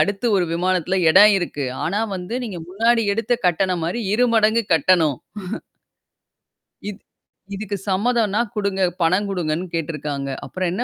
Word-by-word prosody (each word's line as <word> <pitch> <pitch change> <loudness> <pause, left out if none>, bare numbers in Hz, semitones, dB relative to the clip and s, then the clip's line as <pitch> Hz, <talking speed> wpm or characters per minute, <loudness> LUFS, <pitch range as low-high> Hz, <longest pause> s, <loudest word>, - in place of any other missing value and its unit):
அடுத்து 205 +4 0
1 180 - +2
விமானத்துல 185 +1 0
எடம் 210 +5 +8
இருக்கு. 150 -5 -3 0.2
ஆனா 200 +6 -1 0.2
வந்து 180 +6 -6
நீங்க 195 -6 -6
முன்னாடி 230 +4 +2
எடுத்த 230 +2 -1
கட்டணம் 180 0 +1
மாரி 180 +8 -2
2 250 +2 +3
மடங்கு 220 +1 +3
கட்டணும். 160 -3 +3 1.7
இது 210 0 -8 0.6
இதுக்கு 205 0 -4
சம்மதம்னா 210 +1 +1 0.2
குடுங்க, 200 -2 -1 0.2
பணம் 185 +5 +2
குடுங்கன்னு 175 -2 -2
கேட்டுருக்காங்க. 150 -4 -3 0.2
அப்புறம் 185 -1 -2
என்ன 230 - -1
190 Hz, 135 wpm, -21 LUFS, 170-210 Hz, 1.7 s, எடம்